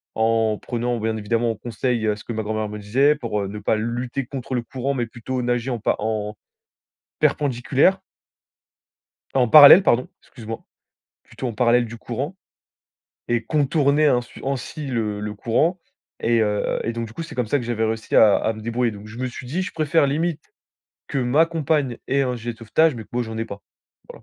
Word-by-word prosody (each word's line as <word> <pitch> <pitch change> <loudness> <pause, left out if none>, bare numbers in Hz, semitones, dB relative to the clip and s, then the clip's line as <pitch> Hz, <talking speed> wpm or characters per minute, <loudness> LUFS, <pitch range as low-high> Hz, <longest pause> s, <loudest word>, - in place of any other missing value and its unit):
en 110 -1 +2
prenant 120 -1 -2
bien 110 0 -1
évidemment 115 +2 0
conseil 120 -1 -2
à 105 - +1
ce 105 - -12
que 120 - -5
ma 110 - -2
grand-mère 110 0 -2
me 105 0 -6
disait, 135 +9 +3
pour, 115 -7 -3
heu, - - -3
ne 105 +2 -6
pas 105 - +1
lutter 120 +4 -3
contre 130 0 -5
le 120 - 0
courant, 130 +3 -3
mais 120 -2 -1
plutôt 125 +3 -4
nager 120 +1 -1
en 120 - -2
pa - - +1
en 105 -1 -2 0.9
perpendiculaire 140 +7 +2 1.3
en 125 -3 +3
parallèle 150 - +10
pardon, 125 -6 +2
excuse 115 -4 -13
moi. 115 0 -6 0.6
Plutôt 130 - -7
en - - -4
parallèle 120 +1 +3
du 115 - -9
courant 135 +12 -5 0.9
et 120 -1 0
contourner 150 0 +2
ainsui 125 -3 0
ainsi 140 +2 -4
le 110 -5 -2
le 105 0 -4
courant. 135 - +1 0.4
Et, 115 0 +2
heu, 105 -1 0
et 115 - -2
donc, 115 0 -4
du 110 - -12
coup, 165 - -6
c'est 165 - -9
comme 125 - 0
ça 145 +7 +1
que 125 - -5
j'avais 115 -1 -1
réussi 110 0 -1
à 105 -2 +7
à 110 - 0
me 110 - -9
débrouiller. 115 +2 0
Donc, 105 +1 -10
je 110 +2 -10
me 130 - -2
suis 125 0 -8
dit: 170 +9 -2
«Je - - -5
préfère 155 -1 +2
limite 155 +2 -1 0.6
que 140 - -3
ma 130 +6 +3
compagne 150 -6 -1
ait 140 +1 +2
un 125 -2 -1
gilet 120 +1 -5
de - - -24
sauvetage, 145 +7 +2
mais 115 - -7
que - - -27
moi 120 0 0
j'en 110 -1 -6
ai 115 - -1
pas», 100 -3 -9 0.5
voilà. - - -12
120 Hz, 205 wpm, -22 LUFS, 110-135 Hz, 1.3 s, parallèle